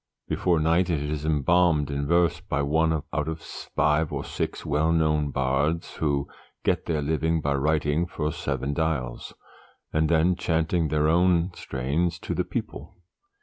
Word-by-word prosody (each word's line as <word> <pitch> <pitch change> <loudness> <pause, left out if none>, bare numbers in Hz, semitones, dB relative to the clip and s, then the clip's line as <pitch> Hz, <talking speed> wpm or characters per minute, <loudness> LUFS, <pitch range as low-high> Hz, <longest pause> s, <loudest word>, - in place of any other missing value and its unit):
Before 85 -3 +1
night 85 +3 +2
it 80 -4 +1
is 75 +1 -3
embalmed 80 0 +2
in 70 0 -2
verse 85 0 +3
by 70 +1 -1
one 80 +3 +2 0.2
out 75 -1 -1
of 80 0 -3
five 75 -1 -1
or - - -3
six - - -4
well 75 +3 +1
known 75 -2 +2
bards 70 +5 -1
who 70 -3 0 0.4
get - - 0
their 80 -3 0
living 80 +2 +1
by 70 -2 0
writing 75 +3 +1
for 75 -2 -2
Seven 70 -3 -3
Dials, 70 -6 -2 0.6
and 80 0 +2
then 85 +2 +3
chanting 80 -1 0
their 75 0 +1
own 90 +1 +3
strains 75 +7 -2
to - - -3
the - - 0
people. - - -6
80 Hz, 155 wpm, -26 LUFS, 75-85 Hz, 0.6 s, verse